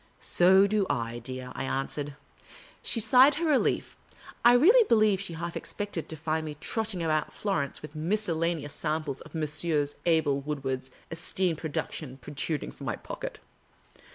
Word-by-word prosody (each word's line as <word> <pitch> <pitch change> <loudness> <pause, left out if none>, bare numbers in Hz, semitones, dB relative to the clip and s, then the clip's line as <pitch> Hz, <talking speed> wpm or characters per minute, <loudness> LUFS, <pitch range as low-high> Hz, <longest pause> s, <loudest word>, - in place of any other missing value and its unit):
" - - -36 0.2
So 190 +3 +7
do 200 -1 +1
I, 115 0 -2
dear," 130 +1 -7
I - - -4
answered. 140 +2 -2 0.7
She 230 - -1
sighed 255 +6 +6
her 335 +3 -1
relief. 300 -4 +1 0.5
I 240 +1 +8
really 395 - +7
believ^e 215 - +4
she 190 -3 -6
half 170 +1 -5
expected 205 -6 -4
to 160 - -4
find 155 +1 -1
me 150 -1 -6
trotting 215 -1 -1
about 155 -2 0
Florence 155 -11 -2
with 150 - -8
miscellaneous 165 -3 -1
sam 155 0 -2
ples 140 -3 -4
of - - -12
Messrs. 150 -1 0
Abel 155 -4 +3
Woodward's 135 -3 -3 0.2
esteemed 165 0 -1
productions 150 -3 -4
pro 125 - -10
truding 150 +1 -2
from - - -9
my - - -1
pocket. - - -7
160 Hz, 160 wpm, -28 LUFS, 145-200 Hz, 0.7 s, I